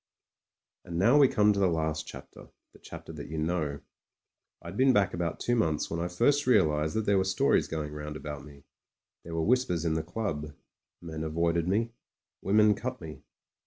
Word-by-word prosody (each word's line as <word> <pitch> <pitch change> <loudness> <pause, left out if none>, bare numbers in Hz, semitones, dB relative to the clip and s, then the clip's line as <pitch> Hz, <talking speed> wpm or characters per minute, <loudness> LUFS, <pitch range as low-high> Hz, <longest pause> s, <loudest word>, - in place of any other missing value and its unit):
And 85 - -6
now 120 +11 +5
we 140 - +7
come 105 -3 +3
to 100 - -2
the 95 - +4
last 80 -2 -1
chapter - - -11
— - - -57
the - - -18
chapter 80 - -10
that 75 -2 -8
you 80 - -5
know. 80 -3 -2 0.8
I'd 85 +3 -9
been 130 +3 +4
back 100 -4 +2
about 85 -1 -3
two 120 - 0
months 80 -10 0
when 85 - -2
I 85 - -1
first 145 +12 +1
realised 80 -10 +3
that 110 -1 0
there 100 -2 +3
were - - +2
stories 95 0 +2
going 75 -2 -4
round 75 0 -6
about 75 -2 -7
me. 70 -1 -14 0.6
There 85 0 -7
were 80 -1 0
whispers 105 -9 +1
in 80 - +1
the 80 - 0
club; 80 -5 -4 0.5
men 80 -2 -5
avoided 85 +1 0
me; 110 +5 0 0.5
women 105 +2 +4
cut 125 +5 -5
me. 80 -2 -9
85 Hz, 195 wpm, -29 LUFS, 80-105 Hz, 0.8 s, we